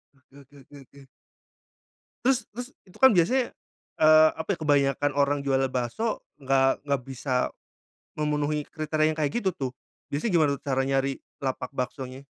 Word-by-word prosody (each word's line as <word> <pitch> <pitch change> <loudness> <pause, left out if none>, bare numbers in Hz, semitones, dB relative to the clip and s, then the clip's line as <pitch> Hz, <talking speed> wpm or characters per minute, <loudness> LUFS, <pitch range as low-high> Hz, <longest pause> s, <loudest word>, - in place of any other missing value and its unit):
Oke 135 0 -27
oke 140 +2 -24
oke 140 +2 -15
oke. 140 +1 -17 1.2
Terus 260 -1 +2
terus, 245 +2 -6 0.2
itu 185 - -18
kan 265 - +9
biasanya, 245 +9 +3 0.5
eee, 155 0 +7
apa 160 - -6
ya - - -5
kebanyakan 145 -1 +2
orang 140 0 +2
jual 135 -1 +1 0.2
bakso 130 - -2 0.2
nggak 135 0 +1
nggak 140 -2 0
bisa 130 0 -2 0.7
memenuhi 150 0 0
kriteria 155 -1 0
yang 155 - -6
kayak 150 -2 0
gitu, 190 - +1
tuh. 135 -6 -4 0.4
Biasanya 185 +9 -1
gimana 160 -4 +4
tuh 140 - -16
cara 135 -1 0
nyari 135 0 0 0.2
lapak 130 -1 -3
baksonya? 130 +1 -5
145 Hz, 155 wpm, -26 LUFS, 135-155 Hz, 1.2 s, kan